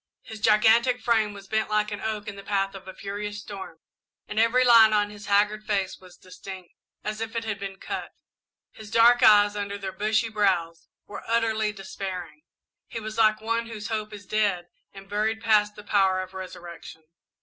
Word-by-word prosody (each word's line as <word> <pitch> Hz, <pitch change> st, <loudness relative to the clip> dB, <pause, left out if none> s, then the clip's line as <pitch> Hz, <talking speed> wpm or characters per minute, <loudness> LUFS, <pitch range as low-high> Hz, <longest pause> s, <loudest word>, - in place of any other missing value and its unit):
His 220 Hz, -, -9 dB
gigantic 225 Hz, +4 st, +4 dB
frame 220 Hz, -4 st, +1 dB
was 200 Hz, -1 st, -11 dB
bent 220 Hz, +1 st, -1 dB
like 210 Hz, 0 st, +1 dB
an 205 Hz, -, -5 dB
oak 215 Hz, -1 st, -3 dB
in 205 Hz, -, -5 dB
the 200 Hz, -, -9 dB
path 195 Hz, -1 st, -1 dB
of 195 Hz, -1 st, -11 dB
a 190 Hz, -, -7 dB
furious 205 Hz, +1 st, -5 dB
storm 195 Hz, -5 st, -9 dB, 0.5 s
and 210 Hz, -, -2 dB
every 230 Hz, +3 st, +4 dB
line 225 Hz, -3 st, +7 dB
on 205 Hz, -1 st, +1 dB
his 205 Hz, -1 st, -11 dB
haggard 205 Hz, +1 st, +2 dB
face 200 Hz, -3 st, -2 dB
was 185 Hz, -1 st, -16 dB
distinct, 185 Hz, -1 st, -11 dB, 0.3 s
as 215 Hz, +1 st, -4 dB
if 225 Hz, 0 st, -5 dB
it 230 Hz, -, -1 dB
had 215 Hz, -3 st, -3 dB
been 195 Hz, -1 st, -6 dB
cut. -, -, -5 dB, 0.6 s
His 215 Hz, -1 st, -12 dB
dark 235 Hz, +2 st, +5 dB
eyes, 205 Hz, -3 st, +6 dB
under 205 Hz, 0 st, -4 dB
their 195 Hz, -1 st, -5 dB
bushy 215 Hz, +3 st, 0 dB
brows, 185 Hz, -6 st, 0 dB, 0.2 s
were 205 Hz, -, -8 dB
utterly 220 Hz, -2 st, +1 dB
despairing; 195 Hz, -, -7 dB, 0.5 s
he 230 Hz, -, -6 dB
was 220 Hz, 0 st, -6 dB
like 215 Hz, -1 st, +4 dB
one 230 Hz, +1 st, -1 dB
whose 220 Hz, -2 st, -7 dB
hope 215 Hz, -1 st, -3 dB
is 205 Hz, -1 st, -10 dB
dead 195 Hz, -4 st, 0 dB, 0.2 s
and 195 Hz, 0 st, -13 dB
buried 215 Hz, +2 st, -1 dB
past 210 Hz, -1 st, +2 dB
the 210 Hz, -, -11 dB
power 190 Hz, -2 st, +2 dB
of 185 Hz, -, -12 dB
resurrection. 175 Hz, -3 st, -9 dB
210 Hz, 190 wpm, -26 LUFS, 195-220 Hz, 0.6 s, line